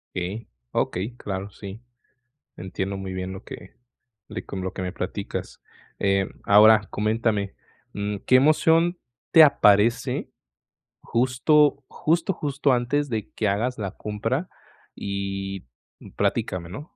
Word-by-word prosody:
Okey, 95 +6 -4 0.2
okey, 105 +7 -2
claro, 100 -3 -5
sí. 100 +2 -9 0.8
Entiendo 95 +2 -4
muy 95 -1 -5
bien 95 0 -4
lo 95 +2 -8
que - - -11 0.5
de - - -6
con 95 - -6
lo 95 0 -3
que - - -4
me 90 -1 -3
platicas, 100 +1 -5 0.4
eh, 100 -1 +1 0.2
ahora 105 +1 +7
coméntame, 105 -2 0 0.4
mm, 100 0 -2
¿qué 130 - +6
emoción 160 +5 +4 0.3
te 165 - +9
aparece 110 -5 +3 0.7
justo, 140 +4 +2
justo, 170 +4 0
justo 145 -3 0
antes 130 +4 +1
de 110 -3 -3
que 110 - -1
hagas 115 +6 -1
la 100 -3 -3
compra? 115 - -2 0.5
Y 95 -2 -4 0.5
platícame, 85 -2 -1
¿no? 145 - -9
105 Hz, 125 wpm, -24 LUFS, 95-130 Hz, 0.8 s, te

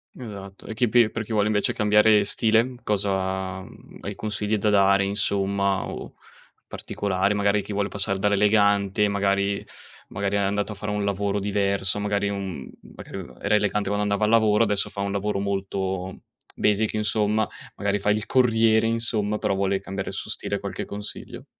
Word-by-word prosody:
Esatto, 100 -5 -9
e 110 - -5
chi 120 +1 +2
pi 120 -1 +5
per 115 0 -4
chi 115 - -10
vuole 105 -1 +2
invece 105 -1 +1
cambiare 105 0 +4
stile 115 +4 +2
cosa 95 -2 -1
mhmm, - - -15
hai - - -5
consigli 105 0 -2
da 105 - +1
dare 100 -1 +4
insomma 100 -1 0
o - - -7 0.5
o - - -9
particolari, 100 0 -1
magari 100 0 +2
chi 100 - -8
vuole 100 0 0
passare 100 -1 -1
dall'elegante 100 0 +3
magari 100 0 0 0.4
magari 100 0 -2
è - - +2
andato 100 +1 0
a - - -6
fare 105 +1 -4
un 105 0 -1
lavoro 100 0 -1
diverso 100 -1 0
magari 105 0 0
in 100 - -2
un 95 -6 -4 0.2
m - - -15
magari - - -9
aveva - - -10
era 105 - +2
elegante 105 -1 +1
quando 105 0 0
andava 105 +1 +1
al - - +1
lavoro, 110 -1 +4
adesso 105 -2 0
fa 100 - -5
un 100 0 -1
lavoro 100 0 -1
molto 95 -1 -3 0.4
basic 105 +1 +1
insomma, 105 0 +1 0.3
magari 100 0 0
fa 105 +1 +1
il 105 +1 -1
corriere 115 -3 +3
insomma 110 -2 0
però 105 -2 0
vuole 95 0 0
cambiare 95 0 -5
il - - -6
suo - - -6
stile, - - -3
qualche - - -5
consiglio? 105 +1 -8
100 Hz, 185 wpm, -24 LUFS, 100-105 Hz, 0.5 s, pi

